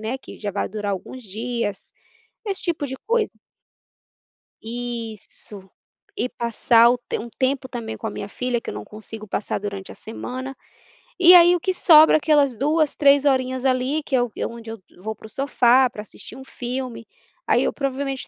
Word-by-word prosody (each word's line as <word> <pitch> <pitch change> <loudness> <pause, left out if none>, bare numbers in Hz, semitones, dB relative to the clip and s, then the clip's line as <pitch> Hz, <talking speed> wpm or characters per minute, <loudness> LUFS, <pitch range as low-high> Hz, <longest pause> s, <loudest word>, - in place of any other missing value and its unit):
né, 220 +4 -3
que - - -12
já 205 - -3
vai 200 - -2
durar 210 -2 -3
alguns 250 +7 -7
dias, 220 0 -4 0.5
esse 395 -2 -2
tipo 335 -5 -1
de 265 - -5
coisa. 460 -1 +1 1.3
Isso. 225 -4 -4 0.5
E 250 - -1
passar 235 0 +4
o 245 - +1 0.2
um 235 +2 -3
tempo 260 0 0
também 230 -3 -5
com 225 - -6
a - - -2
minha 205 - -6
filha, 245 +2 -2
que - - -12
eu - - -4
não 105 0 -6
consigo 215 - -8
passar 210 - -2
durante 200 -1 -6
a - - -12
semana, 255 +4 -7 0.7
e 360 0 +9
aí 350 0 +8
o - - -1
que 375 +3 -1
sobra 315 -4 +7
aquelas 290 -5 +2
2, 300 +3 +1
3 280 -1 +5
horinhas 260 -2 +1
ali 260 +4 +1
que 275 - -1
é 250 - +3
o 240 - -5
é - - -2
onde 230 -1 -10
eu 225 -3 -9 0.2
vou 220 +4 -5
para 220 - -13
o - - -7
sofá 255 -1 +3
para 215 - -8
assistir 210 - -9
um 265 - -10
filme, 250 -2 -5 0.4
aí - - +3
eu - - +1
provavelmente 275 -1 -3
250 Hz, 185 wpm, -22 LUFS, 220-275 Hz, 1.3 s, e